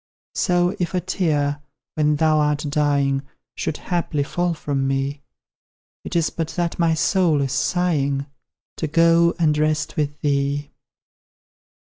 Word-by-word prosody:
So, 175 0 +1
if 175 +1 -2
a - - +3
tear, 150 -5 0 0.3
when 150 -1 +2
thou 155 0 +3
art 150 0 +1
dying, 140 -2 +1 0.3
Should 150 - -3
haply 170 -5 -1
fall 175 +3 -1
from 140 -3 -2
me, 135 +1 -1 0.8
It - - -6
is 165 -2 +2
but 165 -2 -3
that 175 -1 -1
my 165 -1 +3
soul 170 -2 +2
is 135 -2 -1
sighing, 145 -7 0 0.5
To 160 - -2
go 170 +2 +4
and 155 -4 +2
rest 155 0 0
with 145 -1 -1
thee. 140 0 0
155 Hz, 135 wpm, -22 LUFS, 145-170 Hz, 0.8 s, go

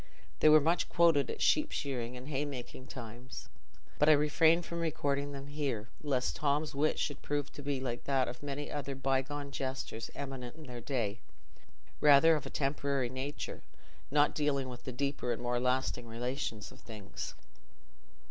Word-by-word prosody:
They 155 - +7
were 155 0 +9
much 165 +4 +1
quoted 165 -5 +4
at - - -2
sheep 305 - +4
shearing 125 -3 -3
and 125 +2 -9
haymaking 135 -3 -4
times, 120 +1 -8 0.5
but 150 - +6
I - - +9
refrain 160 +3 +4
from 170 0 -5
recording 145 -3 0
them 140 -1 -6
here, 140 -7 -2
lest 135 -4 0
Tom's 150 +1 +1
wit 145 +3 +2
should 145 -1 -2
prove 145 -1 -2
to - - -8
be 140 -1 -1
like 125 -2 -4
that 135 -2 +2
of 125 - -6
many 145 0 -4
other 140 -2 -3
bygone 135 +2 -1
jesters 130 -4 -4
eminent 135 -3 -5
in 160 - -11
their 125 -4 -7
day—rather 120 - +1
of 150 - -3
a - - -5
temporary 140 -2 0
nature, 135 +3 -4 0.5
not 145 +1 +4
dealing 140 -3 0
with 125 -1 -9
the 130 - -3
deeper 140 -1 -1
and 115 - -1
more 120 0 +1
lasting 125 -1 0
relations 115 -1 -3
of - - -14
things. 105 -3 -7
140 Hz, 165 wpm, -33 LUFS, 125-145 Hz, 0.5 s, were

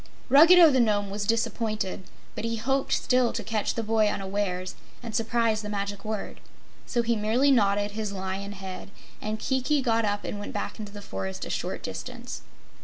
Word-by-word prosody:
Ruggedo 330 +4 +8
the 260 - +3
Nome 205 -4 +2
was 205 0 -3
disappointed, 220 -4 -1 0.3
but - - -5
he 230 0 -1
hoped 265 +5 0
still 250 -2 +2
to - - -3
catch 215 -2 -1
the 230 - -1
boy 220 0 +2
unawares 190 -2 -2 0.3
and 230 -2 -6
surprise 225 -1 +1
the 210 - -6
Magic 200 -1 -3
Word. 215 -1 -4 0.5
So 240 -2 +1
he 235 0 +1
merely 225 +6 +3
nodded 205 -4 +3
his 210 -1 -3
lion 195 +1 -4
head, 190 -1 -8 0.3
and 215 +1 -2
Kiki 265 +5 +1
got 230 -3 +2
up 205 -1 -1
and 205 - -4
went 205 - -6
back - - -4
into 210 -1 -6
the 205 0 -9
forest 95 - -5
a - - -5
short - - -3
distance. - - -6
215 Hz, 180 wpm, -27 LUFS, 200-235 Hz, 0.5 s, Ruggedo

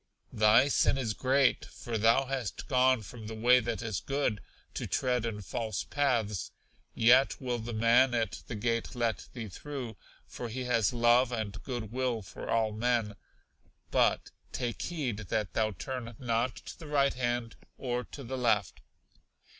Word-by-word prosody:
Thy 110 +5 +5
sin 140 - +3
is 120 -5 -1
great, 130 +3 +2
for 120 - -7
thou 115 +5 +4
hast 130 -5 -4
gone 130 -2 +3
from 110 +2 -9
the 110 - -6
way 120 +3 +5
that 115 -1 -3
is 110 -4 -2
good, 135 -7 -1 0.3
to - - -4
tread 125 -2 0
in 105 -2 -5
false 110 - -3
paths, 115 - 0 0.4
yet 125 +4 +5
will 125 -2 -2
the 115 +2 -5
man 120 +3 +4
at 115 -1 -1
the 115 - -5
gate 115 +3 -1
let 115 -2 -1
thee 115 -3 -5
through, 125 +2 -6 0.3
for 120 - -7
he 130 +3 -4
has 115 -4 +2
love 120 +1 +4
and 110 -4 -4
good 120 -5 -5
will 125 -3 -1
for - - -9
all 110 -1 +2
men; 115 -1 0 0.8
but - - +2 0.2
take 120 -3 -3
heed 145 -11 -2
that 105 -5 -1
thou 110 -1 +2
turn 120 +2 -6
not 120 0 0
to - - -10
the 160 - -9
right 140 -2 +2
hand 120 -2 -2 0.2
or 125 -1 -2
to 140 - -10
the 130 +2 -4
left. 105 -5 +1
120 Hz, 165 wpm, -30 LUFS, 110-130 Hz, 0.8 s, Thy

